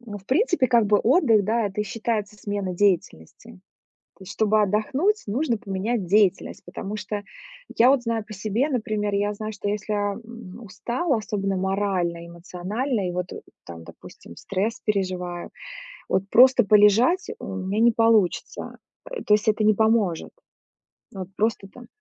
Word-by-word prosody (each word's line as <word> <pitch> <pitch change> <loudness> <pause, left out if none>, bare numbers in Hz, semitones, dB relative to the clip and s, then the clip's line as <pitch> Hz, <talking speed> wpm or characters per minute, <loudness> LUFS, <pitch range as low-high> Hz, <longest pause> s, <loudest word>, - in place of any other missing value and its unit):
ну 210 -4 -8
в 195 - -22
принципе, 345 - +2
как 235 -2 +3
бы 205 0 +4
отдых, 230 - +3
да, 225 +1 +1
это 200 +1 -4
и - - -1
считается 215 -1 -3
смена 200 -3 -4
деятельности. 190 - -2 0.6
То 190 - -13
есть - - -9
чтобы 215 0 +2
отдохнуть, 260 - 0
нужно 240 +2 0
поменять 200 0 -3
деятельность. 195 -1 +2
Потому 205 +2 -6
что, 205 0 -5 0.5
я 245 +3 +6
вот 270 -3 +3
знаю 230 -2 -2
по 215 - -10
себе. 215 +7 -1
Например, 215 -6 -2
я 205 +1 0
знаю, 215 +1 -6
что 205 - -4
если 210 +1 -3
я, 205 -1 -1
м, 230 -2 -11
устала, 235 - -2
особенно 200 -3 -2
морально, 185 -3 -1
эмоционально, 190 +6 -3
и - - -3
вот 180 0 -3 0.4
там 85 -1 -10
допустим 85 - -14
стресс 205 - -3
переживаю, 185 -4 -3 0.6
вот 190 - +1
просто 250 -2 +6
полежать 215 - +4
у 190 - -6
меня 195 +3 -2
не 235 0 +5
получится. 225 -5 +1 0.3
Э, - - -6
то 210 - +3
есть, 210 +1 -3
это 215 0 +2
не 215 0 +5
поможет, 220 -5 +1 0.8
вот 190 -1 -6
просто 215 -2 -1
там 240 +4 -14
210 Hz, 160 wpm, -24 LUFS, 195-230 Hz, 0.8 s, я